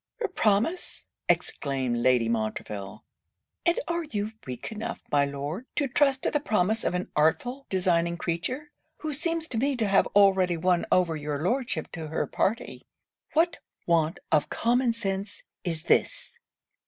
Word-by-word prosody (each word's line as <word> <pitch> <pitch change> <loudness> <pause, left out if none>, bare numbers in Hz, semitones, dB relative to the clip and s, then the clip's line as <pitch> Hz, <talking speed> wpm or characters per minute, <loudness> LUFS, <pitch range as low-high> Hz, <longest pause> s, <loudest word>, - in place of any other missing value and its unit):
'Her 445 -4 -1
promise!' 230 - 0 0.2
exclaimed 135 -4 0
Lady 120 -1 +3
Montreville. 105 -2 -3 0.6
'And 340 - +3
are 340 0 -1
you 210 -6 -3 0.2
weak 125 - -5
enough, 220 0 -4
my 145 -1 +4
Lord, 145 - -5
to 285 - +1
trust 270 0 +2
to - - +1
the 295 - +2
promise 220 -5 +1
of - - 0
an 180 - -3
artful, 245 - +1
designing 170 -2 +1
creature, 250 - -3 0.3
who 310 -1 -4
seems 330 +2 -1
to 225 - -1
me 275 +3 +1
to 225 -4 0
have 195 0 +4
already 190 -3 +5
won 180 +1 +2
over 175 -3 +3
your 150 -1 -3
Lordship 235 - -1
to 160 -1 -6
her 160 - -1
party? 220 +4 -2 0.5
What 330 +2 +2 0.3
want 165 -2 +2
of 150 -1 +3
common 240 +1 +2
sense 200 -3 -4 0.2
is 165 -3 -2
this! - - +1
190 Hz, 155 wpm, -27 LUFS, 155-255 Hz, 0.6 s, already